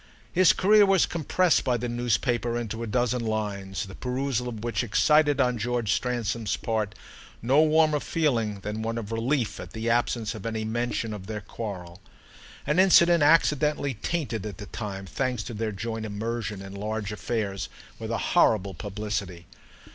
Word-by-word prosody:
His 185 0 +6
career 210 +2 +5
was 195 -3 +4
compressed 170 +2 +1
by 125 -3 +1
the 120 +1 -3
newspaper 120 0 0
into 115 -1 -4
a 115 - -3
dozen 120 +2 0
lines, 100 -5 -3
the 95 - -10
perusal 125 +1 -2
of 110 -2 -7
which 115 -3 -1
excited 145 +6 +3
on 125 -3 +2
George 120 -2 -1
Stransom's 115 -2 -1
part 110 -2 -2 0.4
no 135 +6 +4
warmer 155 -1 +4
feeling 115 -12 0
than 105 +2 -4
one 115 +1 -2
of 115 -2 -5
relief 120 +1 -1
at - - -9
the 115 +1 -1
absence 115 -1 0
of 110 -4 -8
any 110 -1 -3
mention 115 0 -2
of 95 -2 -8
their 105 -1 -4
quarrel, 100 -4 -7 0.6
an 150 +4 +1
incident 175 -3 +6
accidentally 150 -2 +3
tainted 120 - -3
at 100 -4 -7
the 105 - -7
time, 100 -2 -6
thanks 125 +4 -2
to 115 - -7
their 110 0 -2
joint 110 +2 -4
immersion 105 -1 -4
in 95 0 -9
large 105 +1 -3
affairs, 105 -3 -3 0.3
with - - -5
a - - 0
horrible 100 -3 +2
publicity. 100 -4 -4
115 Hz, 165 wpm, -26 LUFS, 105-125 Hz, 0.6 s, His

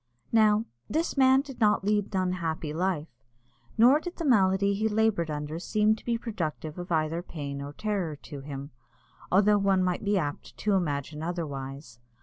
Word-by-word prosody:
Now, 215 -1 +4 0.2
this 320 +10 -1
man 265 -1 +5
did 275 -3 -11
not 210 -3 +3
lead 205 0 +2
an - - +3
unhappy 165 -4 -3
life, 175 -2 0 0.7
nor 250 +6 +6
did 350 +2 -7
the 335 - -4
malady 200 -5 +3
he 215 +2 0
laboured 210 -6 +1
under 150 +2 -4
seem 210 +4 +2
to - - -15
be 235 -1 0
productive 165 -8 -4
of 175 0 -7
either 160 +1 +1
pain 140 -5 -6
or 140 +1 -7
terror 195 -5 -2
to 145 0 -10
him, 140 0 -7 0.6
although 205 +2 +5
one 195 -2 +3
might 180 +1 -1
be 205 0 +2
apt 145 -5 -4
to 210 - 0
imagine 150 -4 -1
otherwise. 140 -7 -5
185 Hz, 170 wpm, -28 LUFS, 155-215 Hz, 0.7 s, nor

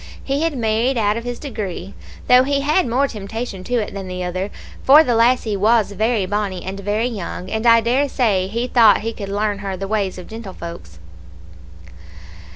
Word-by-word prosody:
He 275 +2 -1
had 325 -4 -1
married 230 +3 +1
out 210 -2 +2
of 230 +1 -5
his 245 0 -4
degree, 205 - -6 0.3
though 250 0 +7
he 280 +1 0
had 305 +5 +2
more 260 +4 +1
temptation 215 -2 -6
to 245 - -1
it 220 -4 -1
than 195 -1 -6
the 180 0 -4
other, 185 +2 -3 0.3
for 295 +4 +8
the 245 - 0
lassie 230 -2 +2
was 215 +1 +2
very 215 0 0
bonnie, 200 -2 -2
and 190 +1 -6
very 205 +3 -1
young, 195 -5 -5
and 220 +2 -1
I 230 0 +7
dare 260 +5 +1
say 200 -9 +1
he 230 +5 -2
thought 230 -4 +5
he 225 +1 -3
could 200 -3 -7
learn 205 0 -1
her 195 -2 -4
the 195 +1 -5
ways 200 -3 -1
of 180 - -8
gentlefolks. 170 - -9
220 Hz, 190 wpm, -20 LUFS, 195-245 Hz, 0.3 s, for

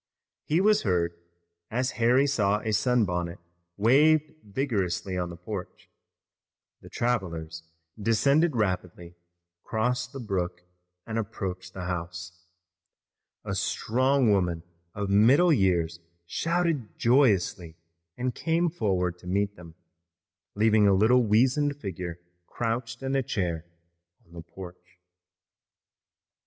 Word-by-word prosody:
He 160 +4 +2
was 210 +1 +4
heard, 85 -4 0 0.6
as 125 +3 -1
Harry 125 +4 +5
saw 105 -7 +1
a 110 - -2
sunbonnet 100 -6 +1 0.4
waved 150 +8 +4
vigorously 100 -5 -2
on 90 -1 -2
the 85 - -8
porch. 90 +1 -8 0.9
The - - -13
travelers 85 -9 -2 0.4
descended 140 +8 +3
rapidly, 90 -4 -2 0.5
crossed 125 +3 -1
the 135 - -7
brook, 90 -6 -3 0.4
and 115 0 -2
approached 95 -4 -5
the 95 -1 -5
house. 90 0 -6 1.0
A - - -3
strong 130 +1 +1
woman 90 -4 +1 0.3
of 100 -1 -2
middle 130 - +5
years 85 - +1 0.3
shouted 165 - -1
joyously 100 - +2 0.4
and 125 0 -2
came 165 +4 0
forward 90 - -1
to 90 - -13
meet 100 +2 0
them, 85 -3 -13 0.8
leaving 105 0 +4
a 100 - +5
little 115 +6 +5
weazened 130 +7 +2
figure 90 - -5 0.3
crouched 115 +1 -3
in 135 +1 -1
a 135 - +3
chair 85 -9 -2 0.6
on 85 - -22
the 85 - -8
porch. 90 +1 -12
105 Hz, 115 wpm, -27 LUFS, 90-125 Hz, 1.0 s, Harry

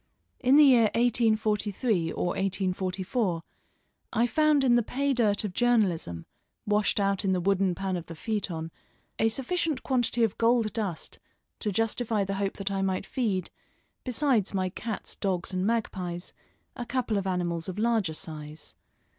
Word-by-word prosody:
In 255 +2 +4
the 300 - +9
year 245 -5 +6
1843 215 -5 +1
or 175 - -1
1844, 185 0 -1 0.7
I 235 +1 +2
found 305 +2 +3
in 250 -2 +4
the 240 - +5
pay 275 +5 -1
dirt 215 -5 +2
of 205 -4 -3
journalism, 180 - +1 0.4
washed 210 0 +2
out 195 0 +1
in 190 -1 +2
the 185 - +1
wooden 190 0 +1
pan 190 0 -2
of 175 -2 -5
the 165 - -8
feuilleton, 170 -4 -3 0.5
a 225 - +4
sufficient 280 +4 -1
quantity 245 -2 +1
of 225 - 0
gold 230 -1 +3
dust 200 -7 -4 0.4
to 210 - -1
justify 225 +1 0
the 195 0 -3
hope 195 -1 -1
that 195 0 -2
I 195 -1 -1
might 190 0 -1
feed, 200 -8 -2 0.5
besides 250 -6 +1
my 185 -1 0
cats, 220 +3 -6
dogs, 185 -2 -2
and 185 +2 0
magpies, 185 -6 -2 0.4
a 245 - -4
couple 245 -5 0
of 195 - -4
animals 175 -2 -1
of 185 - -6
larger 215 -7 +1
size. 155 -1 -8
205 Hz, 155 wpm, -28 LUFS, 185-235 Hz, 0.7 s, the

